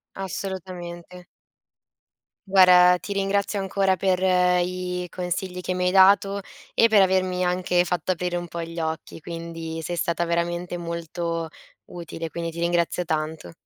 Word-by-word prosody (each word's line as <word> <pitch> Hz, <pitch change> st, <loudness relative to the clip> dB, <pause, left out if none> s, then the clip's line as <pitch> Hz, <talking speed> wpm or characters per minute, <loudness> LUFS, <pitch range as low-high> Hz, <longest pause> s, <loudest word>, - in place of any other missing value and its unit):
Assolutamente. 180 Hz, -2 st, -6 dB, 1.2 s
Guarda 180 Hz, -1 st, +7 dB
ti 200 Hz, -, -8 dB
ringrazio 200 Hz, +1 st, 0 dB
ancora 195 Hz, -1 st, +1 dB
per 185 Hz, -2 st, +1 dB, 0.4 s
i 180 Hz, 0 st, -3 dB
consigli 180 Hz, 0 st, -4 dB
che 185 Hz, 0 st, -2 dB
mi 180 Hz, 0 st, -1 dB
hai -, -, +2 dB
dato, 195 Hz, +1 st, +5 dB, 0.3 s
e 230 Hz, -, +5 dB
per 215 Hz, -3 st, +5 dB
avermi 185 Hz, -1 st, +2 dB
anche 180 Hz, 0 st, +1 dB
fatto 180 Hz, +1 st, -1 dB
aprire 175 Hz, 0 st, -2 dB
un 175 Hz, 0 st, -5 dB
pò 170 Hz, 0 st, -5 dB
gli 165 Hz, 0 st, -6 dB
occhi. 160 Hz, 0 st, -4 dB
Quindi, 165 Hz, 0 st, -6 dB
sei 175 Hz, +1 st, -4 dB
stata 170 Hz, 0 st, 0 dB
veramente 175 Hz, +1 st, -2 dB
molto 170 Hz, -1 st, -4 dB, 0.4 s
utile, 165 Hz, -1 st, -6 dB
quindi 170 Hz, +1 st, -4 dB
ti 170 Hz, -, -8 dB
ringrazio 175 Hz, +1 st, +1 dB
tanto. 155 Hz, -, -3 dB
180 Hz, 140 wpm, -24 LUFS, 170-185 Hz, 1.2 s, Guarda